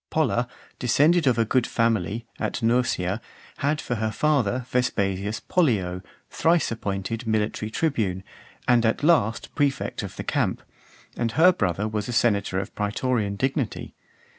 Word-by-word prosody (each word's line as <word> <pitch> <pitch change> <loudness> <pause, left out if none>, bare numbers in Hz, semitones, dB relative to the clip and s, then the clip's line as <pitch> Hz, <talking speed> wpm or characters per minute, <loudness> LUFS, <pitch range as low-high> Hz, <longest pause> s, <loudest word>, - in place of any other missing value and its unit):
Polla, 125 -6 +1 0.3
descended 150 +6 +3
of 125 - +3
a 115 - +3
good 125 +2 +1
family, 115 -1 0
at - - -2
Nursia, 115 -4 +1 0.4
had 145 +2 0
for 120 - -3
her 110 0 0
father 125 -1 +1
Vespasius 105 -4 0
Pollio, 100 - +1 0.3
thrice 165 -4 +2
appointed 105 0 -3
(442) 120 - -5
military 110 0 -1
tribune, 110 - -1 0.4
and 120 -1 +4
at 115 +4 +1
last 145 -9 +2
prefect 145 -3 0
of - - -7
the - - -5
camp; - - -1 0.5
and 115 -2 -1
her 170 +9 +6
brother 100 - -1
was 105 0 -3
a - - -2
senator 100 -5 +2
of 95 +1 -3
praetorian 105 0 -1
dignity. 130 +1 -2
115 Hz, 145 wpm, -25 LUFS, 105-130 Hz, 0.5 s, her